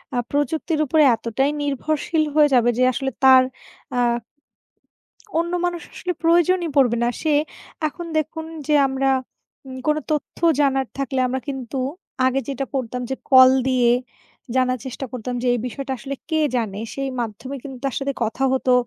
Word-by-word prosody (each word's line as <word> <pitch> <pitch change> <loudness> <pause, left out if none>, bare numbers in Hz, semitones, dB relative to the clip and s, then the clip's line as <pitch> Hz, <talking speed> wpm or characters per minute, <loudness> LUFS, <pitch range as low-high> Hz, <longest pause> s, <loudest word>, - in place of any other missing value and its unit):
আ - - 0
প্রযুক্তির 310 +2 0
উপরে 310 +2 +4
এতটাই 235 +5 -1
নির্ভরশীল 305 +3 0
হয়ে 300 -1 +6
যাবে, 240 -1 +4
যে 255 - +3
আসলে 270 +1 -2
তার 260 -1 +8 0.5
আ - - +2 1.4
অন্য 340 +1 -1
মানুষ 350 -1 -2
আসলে 360 -1 -3
প্রয়োজনই 345 +1 +3
পড়বে 245 -4 +4
না। 240 - +2
সে 310 -2 +1 0.5
এখন 345 +3 -7
দেখুন 315 +1 -2 0.2
যে, 305 - +2
আমরা 270 0 0 0.6
উম 260 0 -7
কোনো 305 0 +3
তথ্য 300 -1 -2 0.2
জানার 270 -2 +2
থাকলে, 275 -1 -2
আমরা 260 +1 -2
কিন্তু 265 -2 -5 0.5
আগে 260 +1 +2
যেটা 275 -1 -3
করতাম 250 -2 -2
যে, 265 - -1 0.2
কল 260 -1 +9 0.2
দিয়ে 250 -2 +3 0.6
জানার 255 -1 +2
চেষ্টা 260 +1 -5
করতাম 250 -1 -5
যে - - +1
এই 245 - 0
বিষয়টা 275 +2 -6
আসলে 275 +2 -5
কে 315 -1 +1 0.2
জানে? 215 -5 -2
সেই 275 0 -3
মাধ্যমে 235 +4 -5
কিন্তু 270 -2 -8
তার 270 - -1
সাথে 275 0 -2
কথা 225 +4 -2
হতো, 260 -1 +2
270 Hz, 160 wpm, -22 LUFS, 255-300 Hz, 1.4 s, কল